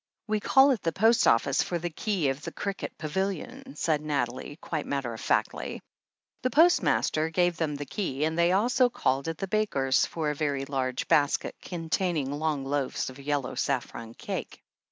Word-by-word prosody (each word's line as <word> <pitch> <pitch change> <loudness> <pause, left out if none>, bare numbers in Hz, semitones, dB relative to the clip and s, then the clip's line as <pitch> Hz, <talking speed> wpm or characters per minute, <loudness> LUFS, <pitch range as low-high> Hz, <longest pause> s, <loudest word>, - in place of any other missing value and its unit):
"We 215 -1 0
call 270 +6 +5
at 235 -7 0
the 165 - 0
post 220 +6 +4
office 125 +4 +3
for 175 - -1
the 170 0 -4
key 180 -4 0
of 135 +2 -3
the - - -6
cricket 200 -1 -5
pavilion," 195 - -4
said 155 -3 0
Nathalie, 145 -2 -2
quite 155 -3 -4
matter 135 -4 -2
of 110 - -8
factly. - - -1 0.6
The 255 - +1
postmaster 280 - +3
gave 175 0 +1
them 155 -3 -1
the 145 0 -5
key, 145 -3 -3
and 160 +1 0
they 170 +1 +3
also 245 +6 +3
called 140 - 0
at 165 -1 -3
the 195 - -3
baker's 160 -11 +1
for 155 -3 -2
a - - -4
very 140 -2 -1
large 130 -2 -2
basket 145 -1 +2
containing 165 -4 -1
long 145 -2 -1
loaves 140 -1 -1
of 130 - -13
yellow 140 -2 -2
saffron 120 -4 -3
cake. - - -6
155 Hz, 175 wpm, -28 LUFS, 140-195 Hz, 0.6 s, call